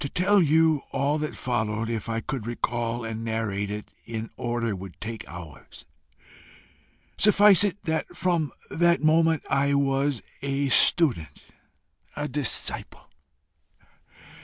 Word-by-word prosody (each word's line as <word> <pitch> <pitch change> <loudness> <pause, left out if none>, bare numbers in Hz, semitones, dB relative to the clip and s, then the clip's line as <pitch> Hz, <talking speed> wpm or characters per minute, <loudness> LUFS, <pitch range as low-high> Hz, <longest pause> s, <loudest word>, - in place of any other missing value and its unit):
"To 140 - -3
tell 195 +4 +3
you 160 -1 +3
all 140 +3 0
that 150 0 -4
followed, 110 -3 -2
if 115 -1 -4
I 115 0 -2
could 130 -6 -5
recall 120 0 -2
and 115 0 -5
narrate 110 -3 -2
it 105 0 -6
in 115 -1 -6
order, 120 -3 -2
would 95 -1 -10
take 110 0 -6
hours. 85 -5 -11 1.3
Suffice 205 -2 +6
it 200 -1 -2
that 160 +2 -3
from 170 -5 0 0.2
that 170 -1 +2
moment 160 0 +3
I 140 +1 +2
was 140 -2 0 0.2
a 140 0 -1
student, 120 - +3 0.7
a 150 0 -3
disciple. 140 -3 -2
135 Hz, 125 wpm, -25 LUFS, 115-160 Hz, 1.3 s, Suffice